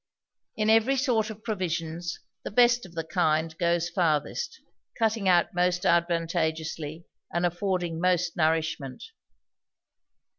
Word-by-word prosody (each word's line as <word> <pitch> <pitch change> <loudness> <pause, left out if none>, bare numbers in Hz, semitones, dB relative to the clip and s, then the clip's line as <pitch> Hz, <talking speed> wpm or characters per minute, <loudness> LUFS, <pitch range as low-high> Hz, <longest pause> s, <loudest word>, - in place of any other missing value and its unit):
In 215 0 +3
every 225 +5 +4
sort 240 -5 +1
of 215 0 -9
provisions, 175 -5 -3 0.2
the - - -4
best 240 0 +4
of 170 - -18
the 165 - -2
kind 160 -2 0
goes 170 -1 +1
farthest; 175 - -1 0.4
cutting 220 -4 +1
out 175 +4 +3
most 180 0 +1
advantageously, 165 -2 0 0.3
and 170 +1 0
affording 175 -2 -1
most 180 -1 +1
nourishment. 155 -4 -1
175 Hz, 115 wpm, -27 LUFS, 165-205 Hz, 0.4 s, every